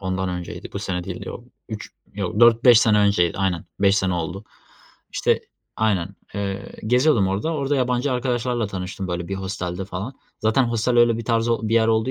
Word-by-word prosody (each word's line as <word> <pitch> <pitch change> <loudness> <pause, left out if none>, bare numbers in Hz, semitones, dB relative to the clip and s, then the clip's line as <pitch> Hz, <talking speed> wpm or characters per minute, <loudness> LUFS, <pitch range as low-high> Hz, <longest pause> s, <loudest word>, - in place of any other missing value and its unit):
ondan 95 0 -2
önceydi, 90 -1 -6
bu - - -3
sene 95 -3 -3
değildi. - - -6
Yok - - -8 0.2
3 - - -7 0.2
yok, 100 -3 -3
4-5 120 +1 +6
sene 105 -2 +4
önceydi. 100 -5 +2
Aynen 95 -4 0 0.2
5 100 0 +4
sene 95 -1 0
oldu, 90 +5 -4 0.7
işte - - +1 0.4
Aynen, 100 -4 0 0.2
eee, 100 -1 -4
geziyordum 125 -4 +3
orada, 105 +13 -1
orada 140 0 0
yabancı 125 +1 +1
arkadaşlarla 125 -2 -1
tanıştım. 95 -1 -5
Böyle, 90 0 -3
bir 95 - -2
hostelde 95 -1 -4
falan 100 +7 -6 0.3
zaten 110 +5 +3
hostel 120 +1 +1
öyle 115 -1 +4
bir 115 - -5
tarz 115 0 +1
o 115 - +1
bir 115 - +1
yer 110 -1 +4
olduğu 110 +3 +2
105 Hz, 185 wpm, -23 LUFS, 95-120 Hz, 0.7 s, 4-5